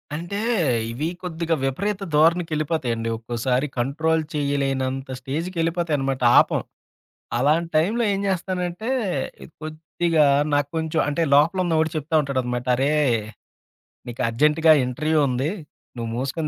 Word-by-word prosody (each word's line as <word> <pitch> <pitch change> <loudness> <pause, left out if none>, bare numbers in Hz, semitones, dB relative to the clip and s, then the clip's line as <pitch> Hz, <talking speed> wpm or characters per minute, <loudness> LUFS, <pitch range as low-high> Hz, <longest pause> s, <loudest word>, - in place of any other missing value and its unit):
అంటే 175 +5 -5 0.5
ఇవి 140 +7 -2 0.2
కొద్దిగా 165 -1 -1
విపరీత 195 +9 -1
ధోరణికెళ్ళిపోతాయండి. 155 -7 +1
ఒక్కోసారి 120 +4 -1
కంట్రోల్ 160 +5 0
చేయలేనంత 135 -2 -1
స్టేజ్‍కెళ్ళిపోతాయన్నమాట 160 -2 -2 0.2
ఆపం. - - +2 0.8
అలాంటి 155 +6 +2
టైమ్‍లో 215 +9 +1
ఏం 195 - -1
జేస్తానంటే 185 +3 -2 0.7
కొద్దిగా 155 0 0 0.3
నాక్కొంచెం 160 +3 0
అంటే 145 +3 0
లోపలున్న 165 +2 +3
వాడు 160 0 +1
చెప్తా 155 +2 -2
ఉంటాడనమాట. 125 -2 -2
అరే! 135 +4 +1 1.2
నీకర్జెంట్‍గా 150 +7 +3
ఇంటర్‌వ్యూ 155 +5 0
ఉంది. 130 +6 -1 0.5
నువ్వు 115 -1 -4
మూసుకొని 135 +5 -2
155 Hz, 100 wpm, -23 LUFS, 135-165 Hz, 1.2 s, లోపలున్న